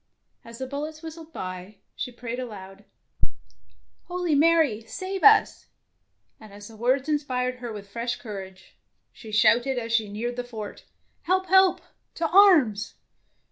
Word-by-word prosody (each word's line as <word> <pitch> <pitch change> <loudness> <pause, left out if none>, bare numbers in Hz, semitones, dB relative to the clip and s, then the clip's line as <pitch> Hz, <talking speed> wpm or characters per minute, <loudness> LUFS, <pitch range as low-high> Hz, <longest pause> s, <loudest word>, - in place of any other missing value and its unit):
As 230 0 -11
the 260 - -4
bul 280 +2 -5
lets 310 +1 -10
whistled 325 0 -9
by, 185 - -7 0.2
she 250 - -4
prayed 245 0 -6
aloud, 200 -5 -9 0.6
— 80 0 -36
"Holy 355 -2 -1
Marie, 300 -7 +3
save 375 +8 -5
us! 425 0 +5 0.4
" - - -47
and 215 -2 -14
as 205 +1 -11
the 225 - -13
words 255 +5 +1
inspired 255 -4 -1
her 245 -2 -6
with 205 -2 -8
fresh 235 +4 -3
courage, 190 -4 -10 0.3
she 220 - -11
shouted 240 +5 +3
as 230 -1 -3
she 220 -3 +2
neared 235 +4 -4
the 245 - -2
fort, 220 -4 -8 0.2
— - - -44
"Help, 375 +1 +2
help, 380 0 +5 0.3
to 330 - 0
arms!" 305 - +5
240 Hz, 160 wpm, -25 LUFS, 210-310 Hz, 0.6 s, us